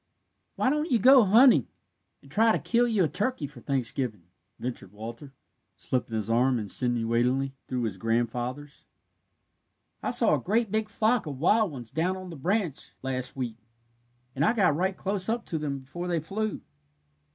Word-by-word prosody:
"Why 260 - +1
don't 300 +2 -1
you 250 - +4
go 255 +2 +7
hunting, 235 +7 +6 0.6
and - - -17
try 225 +1 +4
to - - +2
kill 240 +1 +1
you 215 -5 +2
a - - +3
turkey 205 - -2
for 140 -3 -11
Thanksgiving?" 125 - -2 0.3
ventured 120 -6 -6
Walter, 115 +6 -8 0.5
slipping 125 -3 -2
his 110 -2 -2
arm 125 +3 +2
insinuatingly 120 +4 0
through 125 -2 -2
his 105 -4 -3
grandfather's. 120 +6 -3 1.1
"I - - -2
saw - - +4
a - - +2
great 220 +1 0
big 215 0 -1
flock 220 -1 +1
of 140 -3 -5
wild 205 - +3
ones 120 -5 -7
down 175 +5 0
on 185 -1 -8
the - - -7
branch 175 +1 -2
last 130 -1 -3
week, 120 -4 -4 0.8
and 140 - 0
I 195 - +4
got 185 -10 +3
right 185 +3 -1
close 195 0 0
up 230 +1 -1
to 160 - -3
them 140 -2 -3
before 175 +7 -6
they 170 -2 0
flew." 205 +7 -3
150 Hz, 170 wpm, -27 LUFS, 125-210 Hz, 1.1 s, go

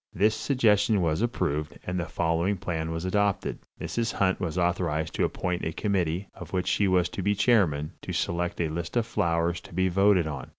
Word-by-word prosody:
This 105 +4 +3
suggestion 110 -3 +2
was 80 +3 +1
approved, 75 - -1
and 90 0 -2
the 85 - -2
following 85 +5 0
plan 80 -4 -3
was 80 +2 -3
adopted: 100 +1 0 0.2
Mrs. 115 -1 -2
Hunt 95 -1 +1
was 90 -1 -3
authorized 85 -3 0
to - - +1
appoint 90 -1 -2
a 80 - -1
committee, 95 -1 -1
of 90 0 -11
which 90 -1 0
she 100 - +2
was 90 -2 +3
to - - -5
be 105 +2 +1
chairman, 85 -11 +2
to - - -6
select 85 0 -1
a 85 - +1
list 85 +6 -3
of 115 - +2
flowers 85 -2 0
to - - -13
be 95 +1 +2
voted 95 -1 +4
on. 75 -4 -5
90 Hz, 200 wpm, -27 LUFS, 85-100 Hz, 0.2 s, voted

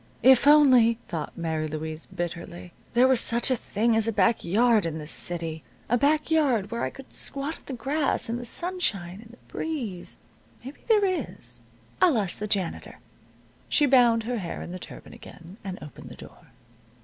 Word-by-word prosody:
"If 260 +2 +6
only," 260 -6 +6
thought 160 -3 -6
Mary 160 -2 -2
Louise, 155 +1 -6
bitterly, 175 0 -7 0.2
"there 250 +2 +5
was 260 -3 +3
such 235 +2 +3
a - - +3
thing 225 0 0
as 225 0 +1
a - - +1
back 205 +2 +2
yard 220 +4 +3
in 165 -2 -3
this 155 0 -4
city 165 -2 -1 0.3
a 240 - +3
back 295 +5 +1
yard 255 -10 +1
where 235 0 -3
I - - -1
could 270 -1 -14
squat 280 +4 -3
on - - -23
the 275 - -5
grass, 275 +5 0
in 230 +1 -2
the 245 - -6
sunshine 225 - +1
and 225 - -16
the 240 - -16
breeze 240 - -5 0.5
Maybe 270 - -9
there 430 -3 +4
is. 370 -2 -4 0.4
I'll 340 -9 +4
ask 195 -4 -1
the 210 - -3
janitor." 195 -4 -2 0.7
She 295 - +3
bound 240 -4 +4
her 240 +1 -3
hair 175 -4 -6
in - - -8
the 185 - -7
turban - - -11
again, 175 +3 -13
and 190 -1 -6
opened 150 - -11
the - - -11
door. - - -15
230 Hz, 185 wpm, -26 LUFS, 175-265 Hz, 0.7 s, If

